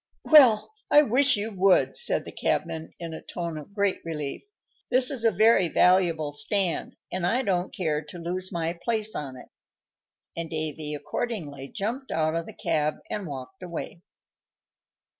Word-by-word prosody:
"Well, 270 - +6 0.2
I 295 - +7
wish 260 0 +4
you 215 +2 -3
would," 190 -1 +3
said 480 0 -1
the - - -8
cabman, 160 0 -2
in 165 -2 -6
a 160 - -7
tone 170 -2 -5
of 200 +7 -13
great 200 -2 +1
relief. 150 -4 -4 0.5
"This 255 +1 +3
is 255 -5 -2
a 225 - +6
very 220 -4 +4
valuable 170 -4 +3
stand, 190 +2 0
and 185 -1 -3
I 235 +9 +1
don't 185 -4 0
care 155 -6 -1
to 150 +4 -10
lose 180 +2 -3
my 165 -2 -2
place 220 -2 -1
on 135 -3 -5
it;" - - -13 0.9
and 170 -1 -4
Davy 155 -1 -3
accordingly 145 - -4
jumped 235 - -4
out 155 0 0
of 165 0 -3
the - - -9
cab 150 0 0 0.2
and 205 -4 -3
walked 140 +7 -8
away. 170 -1 -6
180 Hz, 160 wpm, -26 LUFS, 155-215 Hz, 0.9 s, I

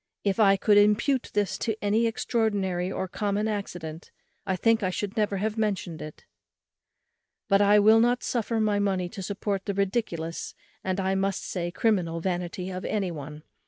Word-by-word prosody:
If 200 +1 0
I 195 -2 +6
could 205 +1 +5
impute 210 +6 +2
this 205 -3 0
to 220 -2 -1
any 215 +3 +2
extraordinary 205 -6 -1
or 190 - -3
common 205 +3 -1
accident 175 -6 -5 0.4
I 190 - +1
think 225 +4 +2
I 185 - +1
should 200 +2 -4
never 210 -3 0
have 215 +3 -2
mentioned 195 -6 -2
it; 155 0 -9 1.2
but 200 -1 +4
I 205 +1 +6
will 215 +2 +6
not 240 +2 +2
suffer 230 -1 -1
my 210 -2 +2
money 190 -3 0
to 195 - -8
support 195 0 -3
the 200 - -2
ridiculous, 190 -5 -2 0.3
and, 190 0 -1
I 190 0 0
must 195 0 -1
say, 175 -2 -3
criminal 175 -4 0
vanity 180 +1 -3
of 185 0 -5
any 195 -4 -1
one. 150 -1 -8
200 Hz, 170 wpm, -27 LUFS, 185-215 Hz, 1.2 s, I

